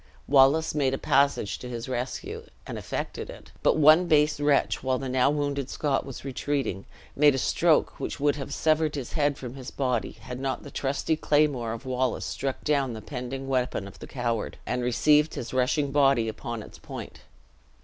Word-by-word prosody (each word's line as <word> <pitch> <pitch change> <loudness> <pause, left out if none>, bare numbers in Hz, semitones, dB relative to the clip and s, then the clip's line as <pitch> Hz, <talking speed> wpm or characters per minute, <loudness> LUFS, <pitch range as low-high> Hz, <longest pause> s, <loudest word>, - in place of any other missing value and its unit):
Wallace 140 +3 +5
made 135 -3 +1
a - - -4
passage 140 -7 +1
to 125 - -7
his 120 0 -5
rescue, 125 0 -4 0.2
and - - -6
effected - - -5
it; - - -11
but - - +3
one 155 +4 +6
base 150 -2 +3
wretch, 145 -1 +2
while 130 0 0
the 135 - -4
now 130 +1 +3
wounded 145 -2 -1
Scot 140 -2 -1
was 135 0 -8
retreating, 135 -7 -2 0.3
made 145 -1 +5
a - - -1
stroke - - +2
which - - -4
would 145 0 +2
have 140 -1 -6
severed 155 0 +1
his 135 -4 -5
head 145 -3 +1
from 125 -2 -7
his 130 -2 -8
body, 125 -4 -1
had 125 0 -8
not 135 0 -2
the 140 - -10
trusty 140 +4 -1
claymore 145 -7 +1
of 115 +2 -6
Wallace 130 -5 -1
struck 130 +8 -3
down 140 -4 +1
the 110 - -7
pending 135 0 -5
weapon 125 -6 -1
of 100 - -13
the - - -9
coward, 120 -4 -2
and 125 - -1
received 150 +5 +3
his 120 - -5
rushing 135 +3 +1
body 135 -5 +3
upon 115 0 -5
its - - -13
point. - - -8
135 Hz, 190 wpm, -27 LUFS, 125-145 Hz, 0.3 s, one